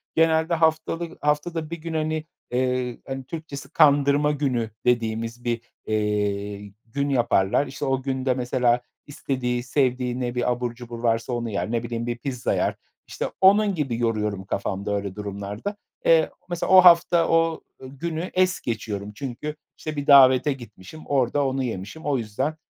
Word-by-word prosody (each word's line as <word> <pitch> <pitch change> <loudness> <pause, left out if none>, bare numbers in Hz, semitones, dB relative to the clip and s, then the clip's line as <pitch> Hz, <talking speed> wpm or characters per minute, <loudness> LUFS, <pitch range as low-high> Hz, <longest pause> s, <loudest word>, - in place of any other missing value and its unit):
genelde 160 +1 +3
haftalı 165 +1 0
haftada 155 +2 -1
1 170 - -4
gün, 165 0 -5
hani, 155 0 -1 0.3
eee, 125 -1 0
hani, 135 0 -4
Türkçesi 150 -1 -7
"kandırma 145 0 +4
günü" 130 -6 -1 0.2
dediğimiz 115 0 0
bir, 120 -1 -1 0.2
eee, 105 -1 -1
gün 140 +5 -2
yaparlar. 120 0 +2
İşte 140 +2 -5
o 135 0 0
günde 130 -1 0
mesela 125 -1 +1 0.3
istediği 125 -4 -2
sevdiği 125 -1 0
ne 125 -1 -3
bir 125 0 +1
abur 120 -1 -2
cubur 120 -1 -8
varsa 115 +1 +1
onu 120 -1 -2
yer. 100 0 -2
Ne 120 -1 0
bileyim, 115 0 -4
bir 120 - -2
pizza 125 -1 -2
yer. - - 0 0.3
İşte - - -4 0.2
onun 200 +1 +5
gibi 135 -7 -1
yoruyorum 105 -4 -1
kafamda 100 +1 -2
öyle 100 -2 -4
durumlarda. 105 - -5 0.3
Eee, - - +5 0.2
mesela 175 -1 -2
o 190 - +9
hafta 170 -1 +6
o, 165 -1 +2 0.2
ııı, 130 - -9
günü 170 +3 -3
es 185 +1 +2
geçiyorum. 105 -3 -4
Çünkü, 140 +4 -5 0.2
işte, 155 -1 -5
bir 145 -1 -4
davete 135 0 +7
gitmişim 120 +2 -12
orada 140 +1 +1
onu 135 0 -1
yemişim. 115 - -6
O 145 -2 +1
yüzden, 115 +7 -2
130 Hz, 160 wpm, -24 LUFS, 115-150 Hz, 0.3 s, o